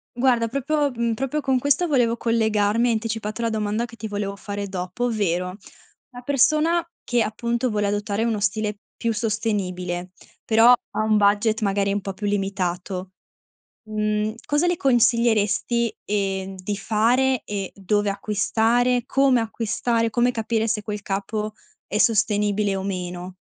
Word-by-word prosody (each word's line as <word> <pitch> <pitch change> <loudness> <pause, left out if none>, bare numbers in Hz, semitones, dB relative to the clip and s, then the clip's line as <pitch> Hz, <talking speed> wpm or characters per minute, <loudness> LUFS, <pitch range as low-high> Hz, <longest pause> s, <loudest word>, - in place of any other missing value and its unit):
Guarda, 240 -2 +2
proprio, 280 +3 0
mhmm, 235 -1 -1
proprio 270 +5 -2
con 265 -2 +1
questo 285 +7 +2
volevo 240 -5 +2
collegarmi, 220 -1 +2
hai 235 - +3
anticipato 220 0 -3
la 230 - +1
domanda 215 +1 -1
che 235 - -12
ti 220 - -6
volevo 205 -1 -3
fare 200 0 -5
dopo, 185 +5 -3
ovvero: 185 -4 -1 0.5
una 245 0 -10
persona 310 +5 +3 0.2
che, 240 -1 +2
appunto, 235 +3 -1
vuole 210 -1 0
adottare 205 +2 -1
uno 220 -3 0
stile 210 +1 -1 0.2
più 230 -1 -1
sostenibile, 185 -5 -2 0.3
però 225 +2 +6
ha 240 - -1
un 215 -1 +3
budget, 210 +2 +3
magari, 200 -1 +1
un 205 - -1
po' 195 0 -5
più 205 +2 -5
limitato, 190 -2 -2 0.7
mhmm, 215 0 -1
cosa 295 +4 +1
le 350 - +2
consiglieresti, 235 - +2
ehm, 195 -2 -2
di 205 +2 -2
fare 235 +5 +2
e 200 -2 -4
dove 205 +1 0
acquistare, 225 +5 +1
come 270 -2 +3
acquistare? 230 +1 -1
Come 245 +2 +2
capire 225 -1 -1
se 215 -1 0
quel 210 0 -5
capo 210 +2 -3 0.3
è 210 - -2
sostenibile 210 -2 +2
o 190 - -3
meno? 180 -1 -4
215 Hz, 150 wpm, -23 LUFS, 200-235 Hz, 0.7 s, però